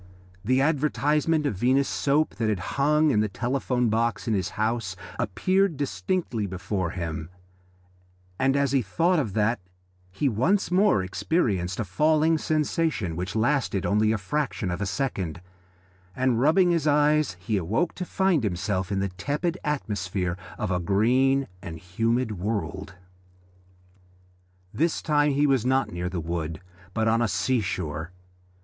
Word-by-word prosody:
The 130 +5 +2
advertisement 150 +1 +1
of 145 - +1
Venus 130 +7 +2
Soap 150 +2 +1
that 115 -2 0
had 105 - +1 0.2
hung 150 +1 +4
in 105 - +2
the 105 - +2
telephone 125 +2 -1
box 115 +1 0
in 115 - +1
his 95 -2 0
house 110 -3 -1 0.2
appeared 165 - +1
distinctly 140 - -2
before 95 -1 -3
him, 80 -2 -5 1.1
and 135 +1 +2
as 140 -2 +1
he 135 -2 +3
thought 165 - +1
of 110 -9 -2
that 110 +3 +1 0.5
he 100 +10 -1
once 160 - +1
more 185 - +4
experienced 95 - -1
a - - +1
falling 155 - +2
sensation 155 - 0
which 90 +5 -4
lasted 120 -4 +1
only 105 +1 +2
a 110 - +1
fraction 115 -2 -2
of 90 +3 -4
a 100 - -1
second, 95 - -2 0.8
and 125 -2 +1
rubbing 175 +5 +4
his 165 -3 +1
eyes 150 -7 +3
he 100 +5 -2
awoke 105 - 0
to 185 - -5
find 185 -6 +1
himself 95 0 -1
in 95 -1 0
the 100 - -1
tepid 145 - -2
atmosphere 95 - -2 0.2
of 105 -5 -2
a 90 - +1
green 125 +9 +2
and 85 -2 -7
humid 110 +5 -1
world. 100 -1 -3 1.8
This 165 +2 +1
time 145 -1 +2
he 145 +2 +3
was 135 -5 +2
not 130 +1 +1
near 90 +1 -3
the 90 -1 -3
wood, 80 -1 -3 0.4
but 110 0 +1
on 115 +1 +3
the 120 - +2
sea 125 +3 +1
shore. 80 -4 -3
115 Hz, 150 wpm, -26 LUFS, 95-145 Hz, 1.8 s, hung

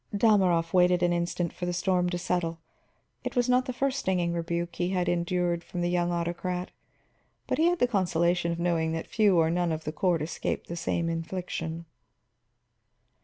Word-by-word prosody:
Dalmorov 185 -7 +3
waited 180 -1 +4
an 175 0 +3
instant 170 0 -1
for 180 - -4
the 175 - -1
storm 180 -1 +1
to 175 - -2
settle. 175 -2 -1 0.6
It - - -4
was 245 0 +2
not 250 +1 +3
the 260 - -3
first 275 +2 -1
stinging 180 -5 0
rebuke 170 0 -3
he 175 0 0
had 180 -2 0
endured 175 0 0
from 175 - -5
the 175 0 0
young 175 -1 +1
autocrat, 175 +1 -2 0.7
but - - -1
he 320 - +4
had 350 +1 +3
the 245 - +3
consolation 175 -5 +1
of 170 - -3
knowing 170 -2 0
that 165 - -3
few 205 -5 +3
or 160 -1 +3
none 175 0 +1
of 160 0 -3
the 155 - -3
court 170 -2 +1
escaped 160 - -3
the 170 - -6
same 170 0 -1
infliction. 165 -1 -4
175 Hz, 185 wpm, -28 LUFS, 170-185 Hz, 0.7 s, waited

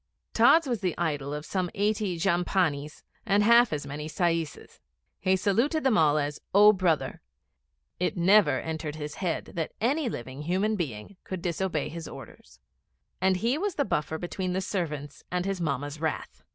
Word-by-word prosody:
Tods 330 0 +6
was 240 -5 -2
the 180 -4 -1
idol 145 -5 -1
of 150 +1 -5
some 185 -2 -1
eighty 205 -3 0
jhampanis, 170 -4 0 0.2
and 200 +1 +3
half 235 +1 +6
as 145 -2 -3
many 150 +2 -6
saises. 165 -3 -2 0.4
He 190 0 +2
saluted 235 - +1
them 265 -4 +3
all 155 -3 +4
as 145 0 -2
'O 210 +1 +8
Brother.' 180 -5 0 0.8
It 180 +1 -1
never 175 -6 +5
entered 160 -2 -4
his 150 -1 -6
head 175 -4 -2
that 165 -2 -3
any 270 +4 +1
living 130 - -6
human 190 +7 0
being 150 - -5
could 185 -2 -6
disobey 175 -3 -1
his 165 +1 -7
orders; - - -12 0.6
and 190 0 +3
he 235 +9 0
was 400 -1 -2
the 285 - +1
buffer 155 -4 -1
between 180 +2 -3
the 185 - 0
servants 150 -7 -4
and 180 0 -1
his 195 -2 -2
Mamma's 145 0 -3
wrath. 160 -1 -3
175 Hz, 165 wpm, -27 LUFS, 150-200 Hz, 0.8 s, O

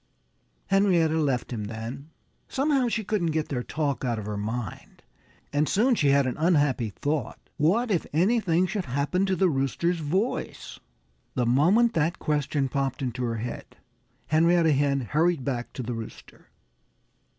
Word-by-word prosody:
Henrietta 175 -5 +3
left 135 -5 -1
him 105 -3 -4
then. 115 +7 -7 0.4
Somehow 275 -2 +1
she 225 -1 -1
couldn't 195 -5 0
get 155 - -2
their 125 -4 -2
talk 140 +1 -2
out 120 -3 0
of 105 - -5
her 105 0 -4
mind. 110 +2 -5 0.5
And 145 +1 +1
soon 245 +6 +3
she 155 -11 +2
had 140 0 +4
an 130 - -2
unhappy 145 -8 +2
thought. 140 - -3 0.2
What 210 +11 +2
if 180 - 0
anything 185 0 +2
should 190 +1 -3
happen 145 +9 0
to 190 - +1
the 190 0 +3
Rooster's 165 +4 0
voice? 185 +10 -2 0.6
The 125 - +1
moment 180 - +4
that 165 0 0
question 145 -2 0
popped 135 0 -2
into 125 0 -3
her 115 -1 -2
head, 120 +3 -7 0.5
Henrietta 165 +1 +3
Hen 140 -1 +2
hurried 155 +3 +1
back 120 -3 -3
to 130 - -5
the 120 +1 -4
Rooster. 115 -1 -10
150 Hz, 155 wpm, -26 LUFS, 125-180 Hz, 0.6 s, had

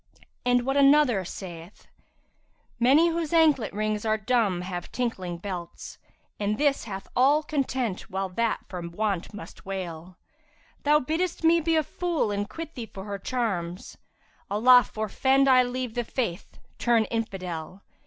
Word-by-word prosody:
And 245 0 +2
what 270 +1 0
another 275 -7 +5
saith, 175 0 -9 0.9
'Many 280 +8 +5
whose 330 -1 -2
anklet 305 -9 +4
rings 215 0 -2
are 220 -1 +1
dumb 215 -4 +1
have 180 -1 -6
tinkling 190 -8 -3
belts, 175 -2 -7 0.2
* - - -43
And 210 +1 0
this 285 -4 +1
hath 195 -3 -7
all 280 +5 +4
content 260 -9 -2
while 190 +1 -2
that 230 +5 -1
for 180 -2 -6
want 180 +2 -2
must 210 0 -11
wail: 180 -2 -6 0.6
Thou 300 +1 +4
bidd'st 325 +6 -2
me 335 +1 +5
be 325 +1 +1
a 315 - +3
fool 335 -7 -1
and 205 +1 -2
quit 325 +6 -7
thee 235 -3 -6
for 190 - -8
her 200 -1 -5
charms; 195 -7 -3 0.3
* - - -35
Allah 245 +4 +6
forfend 265 +6 +2
I 255 -1 +7
leave 250 -1 -3
The 240 - -1
Faith, 230 -7 -4 0.2
turn 235 -2 +3
Infidel! 185 -5 -4
225 Hz, 155 wpm, -26 LUFS, 195-270 Hz, 0.9 s, I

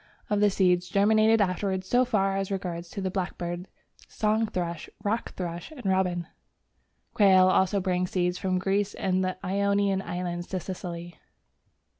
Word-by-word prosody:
of 205 - +2
the 210 0 +5
seeds 180 -2 +2
germinated 220 +2 +4
afterwards 190 0 0
so 245 +4 +4
far 195 -6 +1
as 195 -1 -2
regards 175 -3 -4
the 190 0 -3
blackbird, 180 -1 -4 0.4
song 220 +1 0
thrush, 170 -5 -4
rock 220 +3 -1
thrush, 175 -2 -5
and 290 -8 -11
robin. 185 -2 +1 0.9
Quail 190 -3 +6
also 190 +2 +3
bring 180 -1 0
seeds 180 -1 -1
from 185 -1 0
Greece 195 +2 0
and 185 0 0
the 185 0 -2
Ionian 200 0 +1
Islands 175 -1 -4
to 185 - -3
Sicily. 175 -1 -7
190 Hz, 145 wpm, -27 LUFS, 180-200 Hz, 0.9 s, Quail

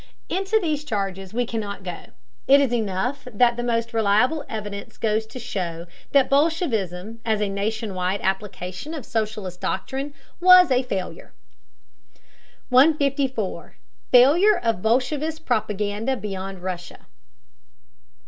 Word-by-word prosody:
Into 390 +4 +1
these 305 -6 -1
charges 195 -7 -3
we 245 +2 0
cannot 210 -4 -5
go; 180 -2 -6 0.4
it 275 +1 +7
is 270 -4 +1
enough 235 +5 -2
that 235 +2 +3
the 240 - -3
most 230 -1 -1
reliable 225 +8 +2
evidence 205 -2 -6
goes 220 0 0
to 235 - -10
show 175 -8 -4 0.3
that 275 -2 +4
bolshevism, 230 - 0
as 220 -2 0
a 210 - 0
nation 205 +2 -3
wide 185 +2 -1
application 190 - -3
of 290 - -7
socialist 210 -5 -3
doctrine, 275 +2 -3 0.2
was 365 -3 +7
a 255 0 +4
failure. 195 -8 -5 1.4
154. 270 -5 +2 0.3
FAILURE 330 +12 +6
OF 230 -6 -1
BOLSHEVIST 290 +8 0
PROPAGANDA 215 +2 -1
BEYOND 195 -3 -6
RUSSIA. 180 -1 -6
225 Hz, 120 wpm, -23 LUFS, 200-275 Hz, 1.4 s, it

